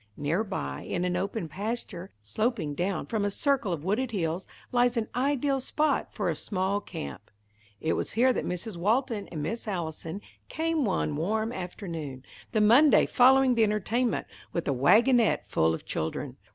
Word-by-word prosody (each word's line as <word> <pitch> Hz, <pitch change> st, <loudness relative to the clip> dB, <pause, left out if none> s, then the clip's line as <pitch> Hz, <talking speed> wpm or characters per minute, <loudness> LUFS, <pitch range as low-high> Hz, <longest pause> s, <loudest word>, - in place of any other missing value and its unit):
Near 160 Hz, +8 st, 0 dB
by, 70 Hz, -, -4 dB
in 175 Hz, 0 st, -2 dB
an 180 Hz, 0 st, 0 dB
open 190 Hz, 0 st, -2 dB
pasture, 195 Hz, 0 st, -5 dB
sloping 160 Hz, -, -1 dB
down 180 Hz, +5 st, -1 dB
from 220 Hz, -3 st, -1 dB
a 205 Hz, -, +1 dB
circle 260 Hz, -1 st, +1 dB
of 160 Hz, -4 st, -3 dB
wooded 215 Hz, +8 st, 0 dB
hills, 180 Hz, -4 st, -2 dB, 0.2 s
lies 245 Hz, 0 st, +3 dB
an 220 Hz, -1 st, 0 dB
ideal 275 Hz, +1 st, +1 dB
spot 300 Hz, +4 st, 0 dB
for -, -, -2 dB
a -, -, 0 dB
small 200 Hz, +1 st, -1 dB
camp. 70 Hz, -, -8 dB, 0.5 s
It 160 Hz, -, 0 dB
was -, -, -2 dB
here 250 Hz, +4 st, +4 dB
that -, -, -2 dB
Mrs. 180 Hz, +2 st, -4 dB
Walton 220 Hz, +3 st, 0 dB
and 155 Hz, -3 st, -5 dB
Miss 225 Hz, +8 st, -4 dB
Allison 170 Hz, -1 st, -4 dB, 0.3 s
came 320 Hz, -3 st, 0 dB
one 180 Hz, -6 st, 0 dB
warm 215 Hz, +8 st, -1 dB
afternoon, 165 Hz, -, -6 dB, 0.3 s
the 215 Hz, -, +2 dB
Monday 250 Hz, +8 st, +6 dB
following 260 Hz, +1 st, +5 dB
the 230 Hz, -2 st, +3 dB
entertainment, 220 Hz, +3 st, 0 dB, 0.3 s
with 170 Hz, -, -3 dB
a 140 Hz, -, +2 dB
wagonette 220 Hz, -, +4 dB
full 80 Hz, 0 st, +2 dB
of 80 Hz, -, -4 dB
children. 80 Hz, +1 st, -3 dB
205 Hz, 165 wpm, -28 LUFS, 170-240 Hz, 0.5 s, Monday